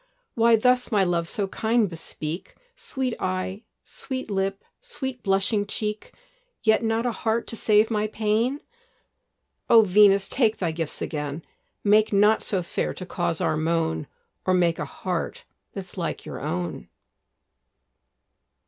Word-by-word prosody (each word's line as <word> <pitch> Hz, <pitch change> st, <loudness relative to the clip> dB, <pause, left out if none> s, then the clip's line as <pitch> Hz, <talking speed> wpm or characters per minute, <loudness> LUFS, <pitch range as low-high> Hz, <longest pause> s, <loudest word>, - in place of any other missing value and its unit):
Why 230 Hz, 0 st, +5 dB
thus, 250 Hz, +3 st, +2 dB
my 205 Hz, -3 st, +4 dB
love, 170 Hz, -2 st, 0 dB
so 200 Hz, -2 st, -1 dB
kind 220 Hz, +2 st, +1 dB
bespeak 165 Hz, -1 st, -6 dB, 0.2 s
Sweet 265 Hz, -, -2 dB
eye, 185 Hz, +2 st, -2 dB, 0.2 s
sweet 260 Hz, -4 st, -6 dB
lip, 195 Hz, 0 st, -1 dB, 0.2 s
sweet 265 Hz, -, -5 dB
blushing 195 Hz, +1 st, +1 dB
cheek, 210 Hz, +1 st, -3 dB, 0.5 s
Yet 220 Hz, 0 st, +3 dB
not 225 Hz, +1 st, 0 dB
a 245 Hz, -, +1 dB
heart 225 Hz, 0 st, -1 dB
to -, -, -3 dB
save 215 Hz, 0 st, +3 dB
my 215 Hz, -1 st, +1 dB
pain? 220 Hz, +6 st, 0 dB, 1.1 s
O 225 Hz, -1 st, +8 dB
Venus, 200 Hz, 0 st, +5 dB
take 225 Hz, -4 st, +1 dB
thy 175 Hz, -3 st, -1 dB
gifts 160 Hz, -1 st, -3 dB
again! 150 Hz, 0 st, -4 dB, 0.4 s
Make 215 Hz, +1 st, +4 dB
not 210 Hz, +2 st, +4 dB
so 190 Hz, -3 st, 0 dB
fair 170 Hz, -, -2 dB
to 185 Hz, -, -7 dB
cause 170 Hz, -2 st, -2 dB
our -, -, +1 dB
moan, 155 Hz, -, 0 dB, 0.4 s
Or 185 Hz, -, +2 dB
make 170 Hz, -2 st, +2 dB
a -, -, -2 dB
heart -, -, -4 dB, 0.3 s
that's -, -, -7 dB
like -, -, -3 dB
your -, -, -6 dB
own. 90 Hz, 0 st, -4 dB
210 Hz, 140 wpm, -25 LUFS, 180-225 Hz, 1.1 s, O